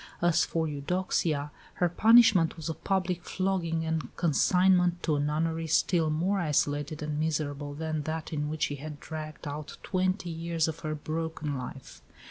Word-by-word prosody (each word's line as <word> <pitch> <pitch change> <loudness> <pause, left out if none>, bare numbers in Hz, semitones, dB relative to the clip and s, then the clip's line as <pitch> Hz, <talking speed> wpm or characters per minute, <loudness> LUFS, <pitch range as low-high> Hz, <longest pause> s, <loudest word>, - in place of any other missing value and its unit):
As 175 -1 +3
for 165 -1 -1
Eudoxia, 150 -1 -1 0.2
her 175 - +2
punishment 220 -3 +5
was 160 0 -5
a - - -1
public 185 -1 -1
flogging 175 -4 -1
and 160 -5 -2
consignment 180 +2 +3
to 155 - +1
a - - 0
nunnery 160 +2 -1
still 160 +1 +2
more 180 +6 +1
isolated 145 -1 0
and 150 0 -2
miserable 145 -2 -2
than 155 0 -2
that 160 +2 -4
in 150 -1 -1
which 155 0 -2
she 145 - -1
had 150 +1 -8
dragged 155 0 -7
out 145 +1 -6
twenty 185 -1 0
years 165 0 -1
of 160 0 -4
her 155 -1 -3
broken 155 -1 -3
life. 130 0 -8
160 Hz, 160 wpm, -29 LUFS, 150-175 Hz, 0.2 s, punishment